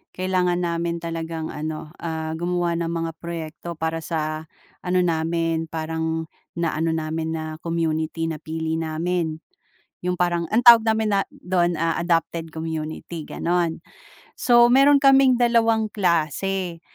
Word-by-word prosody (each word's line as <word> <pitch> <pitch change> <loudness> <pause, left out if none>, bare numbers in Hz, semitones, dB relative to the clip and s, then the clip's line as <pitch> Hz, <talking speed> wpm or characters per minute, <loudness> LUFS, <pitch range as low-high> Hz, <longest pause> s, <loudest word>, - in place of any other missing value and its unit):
Kailangan 180 -1 0
namin 170 0 -2
talagang 165 -1 -4
ano, 155 0 -5
ah, 160 -1 -3
gumawa 175 -1 0
ng 170 - -1
mga 165 0 -2
proyekto 170 0 -6
para 160 +1 -2
sa 155 -1 -3 0.3
ano 180 0 0
namin, 165 -1 0
parang 160 0 -2 0.3
na-ano 165 -1 0
namin 160 0 -2
na 160 - -3 0.2
community, 165 -1 -1
napili 160 0 -3
namin. 165 +1 -1 0.7
Yung 180 - +1
parang 175 -1 0
ang 235 - +4
tawag 235 -2 +9
namin 220 -1 +2
na 195 -1 +1
do'n, 175 -1 0
ah, 165 +1 0
adopted 165 -1 -1
community, 160 0 -5
gano'n. 170 -1 -1 0.5
So, 240 -1 +5
meron 275 +3 +6
kaming 270 -2 +5
dalawang 230 -2 +3
klase. 175 0 0
165 Hz, 125 wpm, -23 LUFS, 160-180 Hz, 0.7 s, tawag